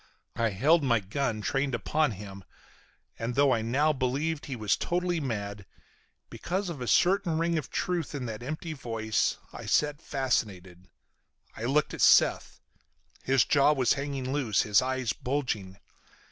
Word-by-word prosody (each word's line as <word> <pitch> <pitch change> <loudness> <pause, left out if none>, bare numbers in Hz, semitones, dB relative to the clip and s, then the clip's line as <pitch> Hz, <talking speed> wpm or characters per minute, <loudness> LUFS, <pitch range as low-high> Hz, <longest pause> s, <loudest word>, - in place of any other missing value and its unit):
I 115 -1 +1
held 145 - +3
my 120 -4 +3
gun 110 +2 -2
trained 135 +2 0
upon 150 -2 0
him, 100 -1 -10 0.8
and, 115 +1 -3
though 140 -1 +4
I 115 - 0
now 140 +7 +2
believed 145 +4 -2
he 135 - -4
was 110 -3 +1
totally 175 -1 -1
mad, 100 -7 -4 0.6
because 190 +1 -3
of 155 -7 -6
a 125 - -4
certain 180 - +3
ring 170 +1 0
of 155 -4 -3
truth 175 -5 -2
in 135 -3 -4
that 110 -1 -6
empty 155 +5 -5
voice, 115 -6 -1 0.2
I - - -8
sat 150 +1 +1
fascinated. 95 - -2 0.7
I 115 - -5
looked 145 +4 +1
at - - -5
Seth. - - +4 0.6
His 130 -3 +3
jaw 145 +1 +4
was 130 -4 +2
hanging 140 -2 -3
loose, 125 -8 +1
his 105 -2 +4
eyes 130 -3 -1
bulging. 115 -9 -3
130 Hz, 155 wpm, -28 LUFS, 110-150 Hz, 0.8 s, though